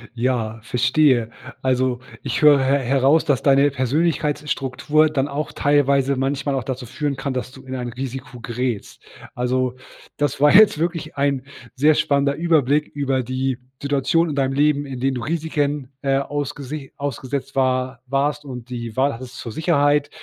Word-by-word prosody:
Ja, 115 -3 -1
verstehe. 125 +1 +2 0.3
Also, 130 -1 +1 0.2
ich 120 -5 -2
höre 150 -2 +7
he 135 +1 +3
heraus, 135 +5 +3
dass 140 -6 +1
deine 140 0 +5
Persönlichkeitsstruktur 145 +1 0
dann 140 -2 0
auch 145 +1 -4
teilweise 140 -1 +2
manchmal 135 +1 -1
auch 130 - -2
dazu 130 +1 -5
führen 140 +4 -3
kann, 135 0 -3
dass 125 0 -4
du 130 - -13
in 130 0 -6
ein 125 -1 -4
Risiko 130 0 -6
gerätst. 120 -2 -4 0.3
Also, 125 0 0 0.4
das 145 -2 -1
war 150 0 +6
jetzt 205 -5 +7
wirklich 170 -1 -2
ein 140 -2 +1 0.3
sehr 150 +4 +4
spannender 140 -1 +1
Überblick 150 -2 +2
über 135 -2 -1
die 130 +1 -2 0.2
Situation 145 +4 +1
in 145 - -3
deinem 135 -1 +1
Leben, 145 +1 +2
in 135 -2 -6
denen 135 +1 0
du 125 - -3
Risiken, 145 -3 -2
äh, 135 -1 +1
ausgese 145 0 -4
ausgesetzt 135 -1 -4
war 130 -1 0
warst 145 +2 0
und 125 -3 -8
die 120 -2 -6
Wahl 140 +2 +2
hattest 125 +1 -9
zur 115 - -6
Sicherheit, 145 -2 +2
135 Hz, 160 wpm, -21 LUFS, 130-145 Hz, 0.4 s, höre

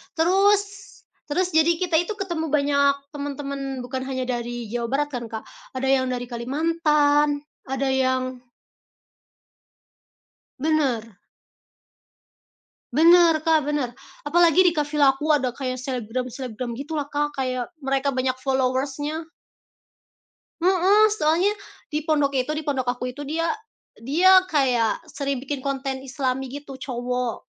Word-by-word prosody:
Terus, 385 +5 +4 0.7
terus 355 +5 0
jadi 320 +1 +4
kita 345 -1 -1
itu 350 +5 -2
ketemu 345 -6 -3
banyak 280 -1 +3 0.2
temen-temen 275 -2 -5
bukan 260 +1 -4
hanya 260 -1 -3
dari 240 -2 -4
Jawa 235 0 -2
Barat 285 +4 0
kan, 245 -3 -4
Kak, 220 -1 -6 0.3
ada 260 +1 -1
yang 265 -1 +3
dari 245 -1 -3
Kalimantan, 295 +2 +1 0.2
ada 270 +1 -1
yang 260 -1 0 2.2
Bener. 260 - 0 1.8
Bener, 335 +1 +7
Kak, 315 -3 +3
bener, 290 -5 -1 0.3
apalagi 340 +3 +4
deket 300 -3 -1
vila 290 -2 +4
aku 270 +3 -5
ada 260 -3 0
kayak 255 0 -4
selebgram-selebgram 250 -1 -4
gitulah, 295 +1 -3
Kak, 295 0 -1
kayak 255 -2 -2 0.2
mereka 270 0 0
banyak 255 0 +1
followers-nya. 270 +4 -1 1.3
Heeh, 380 +4 +5
soalnya 350 +2 +2 0.4
di 300 - 0
pondok 295 -3 +1
itu, 260 +1 0
di 310 - -5
pondok 265 -4 -1
aku 250 0 -3
itu 290 - -9
dia 315 +4 -2 0.5
dia 350 +11 +5
kayak 255 -3 +1
sering 275 -1 -2
bikin 280 0 -4
konten 270 -1 -3
islami 265 -1 -2
gitu, 280 0 -8
cowok. 250 -2 -3
275 Hz, 120 wpm, -24 LUFS, 255-310 Hz, 2.2 s, Bener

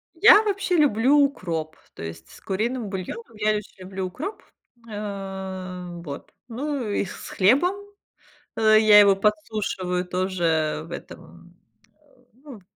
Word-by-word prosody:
Я 425 +4 +8
вообще 395 -3 0
люблю 275 -1 +4
укроп, 170 - -1 0.2
то - - -8
есть 80 0 -8
с - - -15
куриным 220 +3 -2
бульоном 205 +4 -7
я 215 0 +1
еще 210 -2 -5
люблю 190 0 -5
укроп, 315 - -7 0.4
э, 190 -3 -6 0.2
вот, 140 -4 -8 0.2
ну 265 +1 -3
и 205 - 0
с 185 - -9
хлебом, 265 - +3 0.8
э, 215 -1 +5
я 215 -1 +7
его 200 -1 +7
подсушиваю 200 -3 -1
тоже 180 -4 -1
в - - -15
этом, - - -8
м, - - -17 0.4
а, - - -32 0.4
ну, 280 -6 -11
в - - -21
205 Hz, 140 wpm, -24 LUFS, 185-245 Hz, 0.8 s, Я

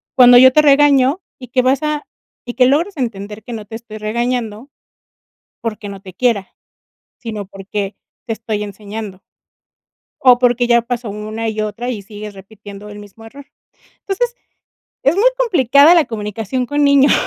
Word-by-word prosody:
cuando 245 -1 +8
yo 260 +1 +7
te 305 - +6
regaño, 285 +1 +4 0.2
y 250 - -10
que 255 +1 +1
vas 260 +1 +2
a 300 -1 -2 0.4
y 240 - -5
que 250 0 +4
logres 335 +9 +1
entender 210 -4 -5
que 240 - -8
no 215 -2 -7
te 220 - -9
estoy 225 -1 -9
regañando 235 +2 -3 0.9
porque 215 -2 -5
no 195 -1 -8
te 190 -2 -11
quiera, 205 -1 0 0.7
sino 215 -4 -6
porque 195 +1 -5 0.3
te 225 - -1
estoy 220 -1 -4
enseñando. 205 -1 -8 1.0
O 250 -2 +6
porque 245 -1 +2
ya 235 0 +3
pasó 240 -1 -4
una 215 +2 -5
y 215 0 -3
otra 225 +3 -4
y 225 -5 -4
sigues 210 0 -9
repitiendo 200 +1 -12
el 205 - -10
mismo 205 +2 -14
error, 275 +5 -13 0.5
entonces, 475 +5 -2 0.7
es 280 - +3
muy 410 - +2
complicada 300 - +5
la 335 -3 +4
comunicación 225 +2 -4
con 290 +3 0
niños, 280 -1 +5
235 Hz, 165 wpm, -17 LUFS, 210-265 Hz, 1.0 s, cuando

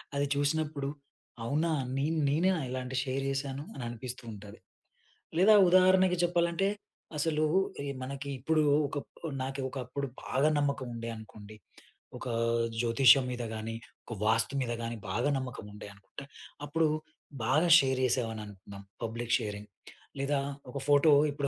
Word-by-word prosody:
అది 140 0 +1
చూసినప్పుడు 145 -1 0 0.6
అవునా! 155 +7 +1 0.3
నేన్ 155 +4 0
నేనేనా 175 +4 +2
ఇలాంటి 130 0 -4
షేర్ 135 +1 -2
చేశాను? 135 0 -3
అని 135 - -7
అనిపిస్తూ 125 +2 -7
ఉంటది. 105 +1 -11 0.8
లేదా 200 +4 +7 0.2
ఉదాహరణకి 185 0 +5
చెప్పాలంటే 175 +2 +1 0.5
అసలు 155 0 +1 0.4
ఈ - - -4 0.2
మనకి 140 +2 -5
ఇప్పుడు 155 +4 +2 0.2
ఒక 145 - -5 0.5
నాకి 135 +1 -4
ఒకప్పుడు 135 +1 -4 0.2
బాగా 140 +4 +2
నమ్మకం 140 -2 -1
ఉండే 115 0 -5
అనుకోండి. 110 -1 -11 0.6
ఒకా 125 - -5 0.5
జ్యోతిష్యం 125 +3 +6
మీద 120 -1 -4
గాని, 110 +1 -4 0.3
ఒక 115 - -6
వాస్తు 115 +4 +2
మీద 120 -2 -2
గాని 115 0 -3
బాగా 120 +9 0
నమ్మకం 130 -5 -6
ఉండే 105 0 -9
అనుకుంటే, 105 +7 -11 0.4
అప్పుడు 160 +2 +1 0.6
బాగా 150 +9 +3
షేర్ 130 -1 +1
చేశామని 115 -3 -1
అనుకుందాం 100 0 -11 0.2
పబ్లిక్ 115 +1 -1
షేరింగ్. 105 -1 -6 0.5
లేదా 140 +1 +1 0.3
ఒక 140 - -5
ఫోటో 145 +2 +5 0.2
ఇప్పుడు 140 0 -2
135 Hz, 135 wpm, -30 LUFS, 115-150 Hz, 0.8 s, లేదా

